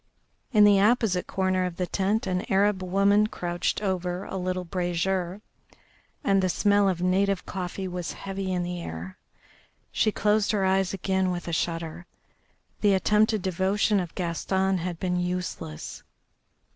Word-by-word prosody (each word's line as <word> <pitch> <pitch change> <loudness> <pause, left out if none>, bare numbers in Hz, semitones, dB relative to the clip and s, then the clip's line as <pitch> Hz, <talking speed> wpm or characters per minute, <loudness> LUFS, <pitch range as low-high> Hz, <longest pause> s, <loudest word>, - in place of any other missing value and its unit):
In 210 -4 +6
the 205 -1 +6
opposite 210 -4 +2
corner 185 -1 0
of 180 -2 -3
the 180 - -1
tent 195 +5 0
an 185 -1 0
Arab 195 0 +3
woman 200 +3 +3
crouched 175 +1 -2
over 180 -1 -1
a - - -7
little 185 0 -2
brazier, 180 +1 -2 0.8
and 195 -1 +3
the 185 - +1
smell 205 +2 +3
of 180 -1 -2
native 195 +1 +1
coffee 190 +1 -4
was 180 -2 -4
heavy 195 -1 -4
in 180 -1 0
the 175 0 -4
air. 85 - -7 0.7
She 215 - +2
closed 210 +1 +1
her 200 -2 +1
eyes 190 -1 +2
again 190 -1 0
with 175 -1 -4
a 170 - -3
shudder. 165 +1 -3 0.7
The 205 -2 +4
attempted 210 +1 +2
devotion 195 +3 +1
of 175 -3 -5
Gaston 190 +2 0
had 175 -1 -4
been 180 -1 0
useless. 180 - -4
185 Hz, 150 wpm, -26 LUFS, 180-195 Hz, 0.8 s, In